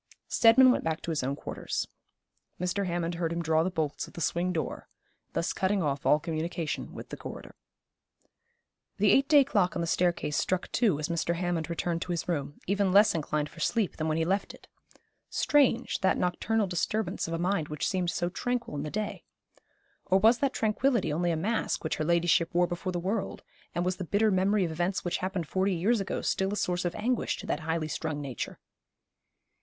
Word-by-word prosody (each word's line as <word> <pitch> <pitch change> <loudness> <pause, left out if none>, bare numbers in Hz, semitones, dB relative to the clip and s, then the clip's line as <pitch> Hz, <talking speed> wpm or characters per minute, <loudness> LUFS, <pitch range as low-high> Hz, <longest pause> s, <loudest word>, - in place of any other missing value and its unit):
Steadman 250 +3 +6
went - - 0
back 160 0 -2
to 170 - -3
his 155 - 0
own 135 +2 -1
quarters. - - -4 0.7
Mr. 180 +2 -1
Hammond 175 -1 -1
heard 170 -1 -2
him 170 0 -2
draw 160 0 +3
the 175 - +1
bolts 155 -5 -2
of - - -15
the - - -8
swing 170 +3 0
door, 165 -3 -3 0.5
thus 165 - -1
cutting 190 0 +1
off 140 -1 -1
all 150 - +5
communication 165 0 -3
with - - -8
the - - -5
corridor. - - -9 1.4
The 205 0 +4
eight 275 +1 +4
day 290 -2 +7
clock 200 -9 +1
on 175 - -1
the - - 0
staircase 170 -3 0
struck 185 0 -1
two 210 - +2
as 150 0 -2
Mr. 170 0 -1
Hammond 175 -2 -2
returned 170 0 -2
to 180 - -3
his 170 - -2
room, 145 -4 -3
even 200 0 +1
less 205 +3 +6
inclined 150 -2 -1
for 165 - -14
sleep 205 +4 0
than 155 - -1
when 155 0 0
he 165 - +1
left 195 +3 -1
it. - - -20 0.6
Strange, 275 -5 +2
that 190 - +2
nocturnal 210 +5 0
disturbance 195 +4 -1
of 165 - -2
a - - -1
mind 175 -2 0
which 150 -1 -2
seemed 180 -2 0
so 175 - -1
tranquil 240 +1 -3
in 140 - -2
the 150 - -4
day. 210 +5 -4 0.8
Or 190 - +3
was 225 +5 +5
that 275 -2 +1
tranquillity 225 - +1
only 175 +3 0
a 165 - 0
mask 215 +7 -1
which 160 - -2
her 155 - -1
ladyship 170 0 +2
wore 175 0 +5
before 175 +2 -3
the 175 - -2
world: 195 +4 -3 0.3
and 175 - 0
was 185 0 0
the 190 - -4
bitter 205 +5 +2
memory 190 +1 +2
of 165 - -3
events 175 +4 -1
which 175 - 0
happened 185 -3 -3
forty 190 +2 +1
years 205 +6 +2
ago 195 - -3
still 190 0 0
a - - -1
source 180 -1 -1
of 175 - -1
anguish 235 +3 0
to - - -8
that - - -1
highly 160 0 -2
strung 155 0 -3
nature? 135 -4 -5
175 Hz, 205 wpm, -29 LUFS, 165-200 Hz, 1.4 s, day